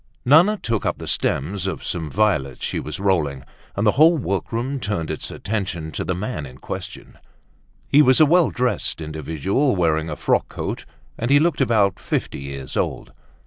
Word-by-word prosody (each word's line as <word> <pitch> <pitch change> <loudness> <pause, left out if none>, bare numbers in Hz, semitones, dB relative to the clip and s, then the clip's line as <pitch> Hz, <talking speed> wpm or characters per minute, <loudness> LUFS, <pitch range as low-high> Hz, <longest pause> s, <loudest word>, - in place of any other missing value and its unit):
Nana 170 +11 +6
took 115 - -2
up - - -1
the - - -8
stems 95 +7 0
of 95 - -4
some 80 -3 -3
violets 75 - 0
she - - -2
was 75 - -6
rolling, 80 -9 0 0.3
and 100 - 0
the 105 - +5
whole 160 +6 +5
workroom 120 +4 -2
turned 100 -8 -2
its 80 - -5
attention 95 -7 -4
to - - -3
the 95 - -2
man 95 - -4
in 65 0 -13
question. - - -8 0.7
He 145 - +6
was 130 -3 +5
a 155 - +8
well 170 +2 +4
dressed 125 -9 -1
individual 80 - -1
wearing 80 -3 +1
a 75 - -3
frock - - 0
coat - - -5 0.3
and 115 - -1
he 140 - +6
looked 155 -2 +1
about 105 -7 +2
fifty - - -3
years 70 -1 -7
old. - - -2
100 Hz, 180 wpm, -22 LUFS, 80-130 Hz, 0.7 s, a